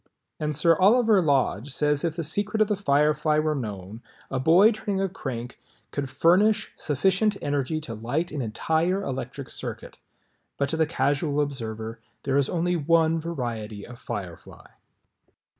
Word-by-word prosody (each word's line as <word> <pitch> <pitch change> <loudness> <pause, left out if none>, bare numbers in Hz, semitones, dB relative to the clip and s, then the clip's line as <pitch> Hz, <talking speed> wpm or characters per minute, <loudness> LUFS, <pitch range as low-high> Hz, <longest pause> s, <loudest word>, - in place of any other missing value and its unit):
And 150 -1 -2
Sir 165 +3 +4
Oliver 215 +1 +5
Lodge 140 - +1
says 150 +1 0
if 165 -2 -1
the 165 - -3
secret 205 +7 -2
of 215 - +4
the 210 - +1
Firefly 150 -3 +2
were 155 0 +1
known, 105 -5 -6 0.3
a 135 - -1
boy 170 - +6
turning 205 -3 -3
a 195 - +1
crank 125 -9 -6 0.3
could 140 -2 -3
furnish 195 +9 +3
sufficient 190 - +1
energy 145 +2 -1
to 125 -7 -6
light 125 +11 -2
an 150 - -3
entire 160 - 0
electric 135 -1 -5
circuit. - - -7 0.6
But 140 0 0
to 160 - -2
the 160 -1 +2
Casual 145 0 0
Observer 115 -6 -3 0.2
there 135 0 +1
is 140 -1 +2
only 175 +1 0
one 165 +1 +3
variety 115 -10 -4
of 120 0 -12
Firefly. 90 -4 -7
150 Hz, 155 wpm, -25 LUFS, 130-170 Hz, 0.6 s, boy